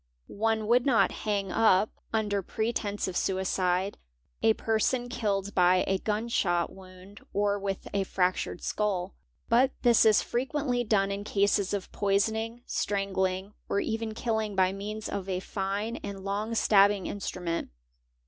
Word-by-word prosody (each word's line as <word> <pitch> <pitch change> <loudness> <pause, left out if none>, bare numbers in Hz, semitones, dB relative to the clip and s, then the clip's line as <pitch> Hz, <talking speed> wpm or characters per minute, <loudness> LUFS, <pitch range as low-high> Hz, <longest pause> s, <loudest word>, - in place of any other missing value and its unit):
One 220 +1 -1
would 240 +3 +4
jot 260 -5 +4
hang 200 -3 -2
up, 215 -2 +4 0.2
under 210 -3 0
pretence 210 0 -2
of 185 - -5
suicide, 190 0 0 0.4
a 220 - +5
person 240 +3 0
killed 205 -4 -1
by 180 0 +4
a 190 0 0
gun 215 +3 -1
shot 175 -7 +1
yound 185 +1 -14
or 205 0 +1
with 195 -1 -4
a 200 -1 +1
fractured 185 -1 -1
skull; 195 -3 -1 0.3
but 255 +3 +4
this 240 -2 +6
is 220 -2 +5
frequently 255 0 -1
done 200 -3 +2
in 200 +1 -3
cases 200 -1 +1
f 200 -2 -3
poisoning, 220 +4 0
strangling, 190 -1 -1 0.2
or 200 - +1
even 220 0 -2
killing 220 -3 -1
by 190 0 +3
means 210 +2 -5
of 195 -1 -4
a 185 -1 -1
fine, 200 +4 -3
and 200 -1 -7
long 205 +3 -2 0.2
abbing 200 -1 +5
instrument. 180 -4 -3
205 Hz, 145 wpm, -28 LUFS, 190-220 Hz, 0.4 s, this